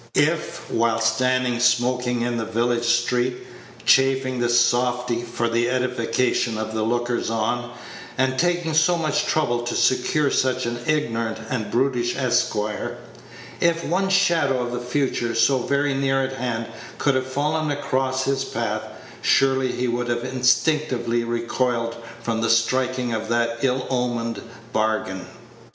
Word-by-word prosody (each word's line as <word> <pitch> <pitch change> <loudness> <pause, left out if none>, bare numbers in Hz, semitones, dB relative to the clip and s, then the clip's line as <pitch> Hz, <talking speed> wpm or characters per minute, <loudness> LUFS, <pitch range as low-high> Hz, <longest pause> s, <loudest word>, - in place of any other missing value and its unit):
If, 155 +2 0
while 115 -1 +1
standing 125 +1 +1
smoking 125 0 +2
in 120 0 -1
the 115 - -1
village 120 +2 0
street, 120 +1 +1 0.5
chaffing 130 -1 +3
the 120 0 +1
softy 120 0 +2
for 120 0 -2
the 120 +1 +1
edification 125 -2 0
of 110 0 -4
the 110 - -1
lookers 120 +2 -1
on, 115 +2 -1 0.5
and 130 0 +1
taking 175 -2 +1
so 160 +3 +4
much 155 -3 0
trouble 120 -6 +1
to 120 0 -3
secure 145 +2 +2
such 130 -1 +1
an 120 0 -3
ignorant 115 -8 0
and 115 -5 -2
brutish 125 -1 0
esquire 110 -5 -1 0.6
if 170 0 +1
one 190 +3 0
shadow 165 -9 +2
of 120 - -4
the 125 - -3
future, 120 -2 -1
so 120 +4 +3
very 140 +2 0
near 135 0 +1
at 130 0 -3
hand, 120 -3 -3 0.3
could 140 - +2
have 130 0 -1
fallen 150 +3 -1
across 130 -2 -1
his 135 0 0
path, - - -2 0.4
surely 135 -1 +3
he 125 - -2
would 120 0 -1
have 120 0 -1
instinctively 125 -1 +1
recoiled 115 0 -1 0.3
from 115 -1 -1
the 115 - +1
striking 125 +1 +1
of 110 0 -3
that 115 0 0
ill 130 -1 0
omened 120 -3 -1 0.3
bargain. 110 -4 -1
125 Hz, 145 wpm, -23 LUFS, 120-135 Hz, 0.6 s, so